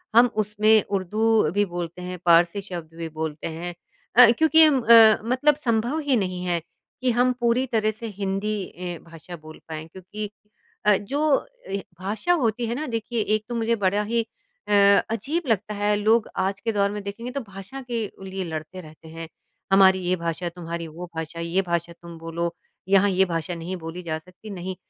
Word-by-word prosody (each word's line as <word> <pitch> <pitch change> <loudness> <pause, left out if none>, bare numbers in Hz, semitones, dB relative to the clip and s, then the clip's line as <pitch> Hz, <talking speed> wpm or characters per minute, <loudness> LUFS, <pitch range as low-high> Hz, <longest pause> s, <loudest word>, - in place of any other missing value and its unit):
हम 240 +1 +8 0.2
उसमें 210 +1 +3
उर्दू 215 -1 +1
भी 205 - +4
बोलते 175 0 -5
हैं, 180 0 -5
पारसी 170 +3 +4
शब्द 175 -5 -8
भी 165 -1 -5
बोलते 155 -1 -3
हैं। 170 +2 -5 0.4
अ, 240 -1 +9
क्योंकि 320 0 +6
हम 290 -4 +4
अ, 225 -2 +8
मतलब 260 +5 +2
संभव 235 +6 +1
ही 265 - +5
नहीं 185 -1 -4
है 175 -1 0 0.4
कि 255 - +2
हम 250 +2 +2
पूरी 240 +2 +2
तरह 215 -1 +2
से 230 - -5
हिंदी 195 +2 -1 0.2
ए, 175 -1 -5
भाषा 165 +2 -10
बोल 155 0 -13
पाएँ 160 0 -6
क्योंकि 190 +4 -7 0.6
अ, 210 - +6
जो 285 +7 0 0.2
ए, 195 - -2 0.2
भाषा 210 - 0
होती 235 -1 0
है 235 - -2
ना 305 +4 -3
देखिए 230 -1 -2
एक 215 - -4
तो 240 - -3
मुझे 230 0 +1
बड़ा 205 +3 +2
ही 230 -1 +1 0.4
अ, - - 0 0.4
अज़ीब 275 - -2
लगता 215 -2 0
है 205 0 +1
लोग 215 +2 +2
आज 195 +1 -1
के 230 - -1
दौर 200 -1 +2
में 210 0 -5
देखेंगे 230 +5 -6
तो 280 - -3
भाषा 195 +7 -9
के 230 -2 -1 0.2
लिए 190 0 -4
लड़ते 160 +2 -6
रहते 155 0 -15
हैं, 165 +1 -8 0.4
हमारी 190 -1 +6
ये 180 +1 +2
भाषा, 170 0 -3
तुम्हारी 170 -1 -6
वो 165 +3 -8
भाषा, 160 +1 -5
ये 170 +3 0
भाषा 170 0 -1
तुम 170 -1 -10
बोलो, 170 +1 -3 0.3
यहाँ 200 +1 +5
ये 190 0 +3
भाषा 170 0 -3
नहीं 170 +3 -5
बोली 165 +2 -6
जा 160 -2 -2
सकती, 185 +6 -14
नहीं, 185 -1 -5
195 Hz, 190 wpm, -24 LUFS, 170-225 Hz, 0.6 s, अ